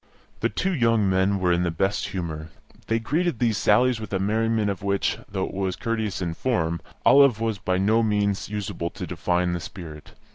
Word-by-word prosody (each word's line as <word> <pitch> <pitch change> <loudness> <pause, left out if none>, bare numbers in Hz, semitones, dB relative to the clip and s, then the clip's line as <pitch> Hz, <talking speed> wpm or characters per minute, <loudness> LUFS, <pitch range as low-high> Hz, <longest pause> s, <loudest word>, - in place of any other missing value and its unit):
The - - +1
two 190 +1 -1
young 115 - +2
men 95 +1 +2
were 90 -2 +1
in 85 0 +2
the 90 - +1
best 95 +5 -1
humour; 80 -4 -5 0.4
they 115 - +2
greeted 155 +7 0
these 115 -2 +1
sallies 125 +3 +3
with 110 - -7
a - - +2
merriment 110 +1 +1
of 95 - -6
which, 100 0 0
though 95 -2 -1
it - - -8
was 95 -1 -1
courteous 110 -5 -2
in 85 -1 -2
form, 85 -7 -1 0.2
Olive 140 -5 +6
was 110 -3 -1
by 95 -1 0
no 110 +4 +3
means 105 -2 0
unable 100 -4 -3
to - - -7
define 90 0 0
the 85 - -2
spirit. 80 -4 -10
100 Hz, 195 wpm, -24 LUFS, 90-115 Hz, 0.4 s, Olive